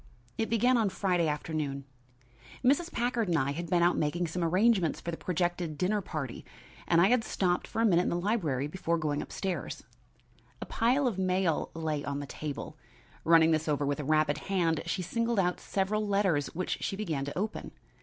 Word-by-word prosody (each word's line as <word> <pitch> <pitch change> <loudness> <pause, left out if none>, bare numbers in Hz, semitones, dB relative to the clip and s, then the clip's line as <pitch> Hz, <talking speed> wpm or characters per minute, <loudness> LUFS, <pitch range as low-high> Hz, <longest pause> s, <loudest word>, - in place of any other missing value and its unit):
It 220 - -1
began 245 +3 +3
on 220 -3 +2
Friday 185 -3 +1
afternoon. 150 -2 -3 0.8
Mrs. 290 +7 +3
Packard 240 -2 0
and 170 -2 +2
I 140 -1 +1
had 170 +3 -5
been 175 -1 +3
out 175 - +4
making 170 +4 0
some 170 +2 -3
arrangements 185 0 +3
for 170 - -4
the - - -3
projected 175 -2 -2
dinner 205 +5 +1
party 150 -9 -5 0.4
and 170 - +4
I 185 +3 +5
had 245 -2 +3
stopped 180 -4 0
for 225 - -1
a - - +5
minute 175 -5 +4
in - - 0
the - - -1
library 175 - 0
before 170 +2 -1
going 150 -2 -1
up - - -9
stairs. 190 -3 -4 0.8
A - - -5
pile 255 +5 +2
of 225 -7 0
mail 185 -3 +1
lay 155 -3 -2
on 140 0 -3
the 145 - -5
table. 145 +1 -6 0.5
Running 165 0 +6
this 160 0 +1
over 145 -1 +1
with 145 +1 -1
a - - -2
rapid 155 0 +2
hand, 170 -5 0
she 180 +2 -1
singled 230 +5 -1
out 180 -2 +1
several 210 +2 -1
letters 190 -8 +2
which 185 +1 -2
she - - -2
began 165 -9 -2
to 145 - -6
open. 210 +3 -3
175 Hz, 195 wpm, -30 LUFS, 155-200 Hz, 0.8 s, Running